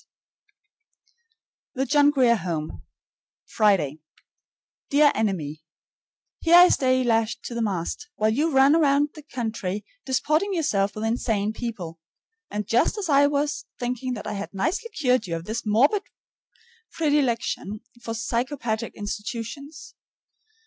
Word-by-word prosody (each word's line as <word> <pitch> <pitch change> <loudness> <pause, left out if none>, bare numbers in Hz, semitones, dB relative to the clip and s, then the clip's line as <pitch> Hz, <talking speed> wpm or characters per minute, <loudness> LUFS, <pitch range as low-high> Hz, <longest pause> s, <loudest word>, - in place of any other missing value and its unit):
S. - - -35 1.7
THE 265 +1 0
JOHN 290 +2 +4
GRIER 255 -5 +4
HOME, 165 -5 -4 0.6
Friday. 190 -9 +1 0.9
Dear 290 +1 +5
Enemy: 160 -8 -2 0.8
Here 335 +1 +4
I 355 +1 +9
stay 255 -1 +2
lashed 225 -2 0
to - - -6
the 235 - -2
mast, 200 - -3
while 215 +1 +2
you 300 +7 +1
run 270 +1 +5
about 290 -2 +3
the 305 - -11
country 220 -7 -4 0.2
disporting 310 +9 0
yourself 205 - 0
with 215 - -4
insane 220 -2 0
people. 195 -9 -6 0.5
And 210 0 -3
just 240 - +2
as 390 -5 -3
I 285 0 +5
was 290 0 -1
thinking 250 +1 -2
that 210 - -7
I - - -3
had 200 0 -5
nicely 345 - -1
cured 255 - +1
you 170 - -2
of 165 0 -6
this 220 +2 -4
morbid 270 - +3 0.9
predilection 255 -8 0 0.2
for 225 -1 -5
psychopathic 235 -1 -2
institutions! 230 +8 -6
240 Hz, 130 wpm, -24 LUFS, 210-285 Hz, 1.7 s, I